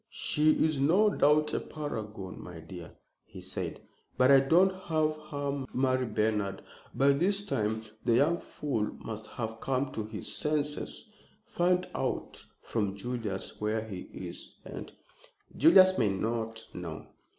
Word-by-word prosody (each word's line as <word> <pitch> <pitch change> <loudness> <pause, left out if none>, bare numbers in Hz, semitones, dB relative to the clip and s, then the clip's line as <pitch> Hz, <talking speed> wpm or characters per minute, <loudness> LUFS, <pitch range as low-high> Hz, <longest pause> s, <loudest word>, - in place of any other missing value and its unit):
"She 155 +1 +3
is 155 -3 0
no 185 +10 +4
doubt 150 -3 +3
a - - +1
paragon, 110 -10 -6
my 90 -2 -9
dear," 85 +1 -9 0.3
he - - -12
said; - - -4 0.4
"but 130 +2 +6
I 135 - +9
won't 175 +8 +4
have 155 -2 +1
her 140 -1 -2
marry 130 -1 +2
Bernard. 105 -3 0 0.3
By 140 +1 +4
this 190 +8 +2
time 110 - -1 0.2
the 115 - +3
young 155 +7 +3
fool 115 -8 -3
must 110 -1 -7
have 110 -1 -5
come 135 +1 0
to 110 - -3
his 105 0 -4
senses. 150 +7 -2 0.4
Find 180 +1 +1
out - - -3 0.2
from 100 -4 -1
Julius 110 -4 -4
where 110 +1 0
he 95 -4 -7
is, - - -8
and - - -7 0.3
" - - -27
"Julius 185 -1 +7
may 110 -4 +3
not 115 +3 -2
know!" 85 -3 -6
130 Hz, 145 wpm, -30 LUFS, 105-150 Hz, 0.4 s, I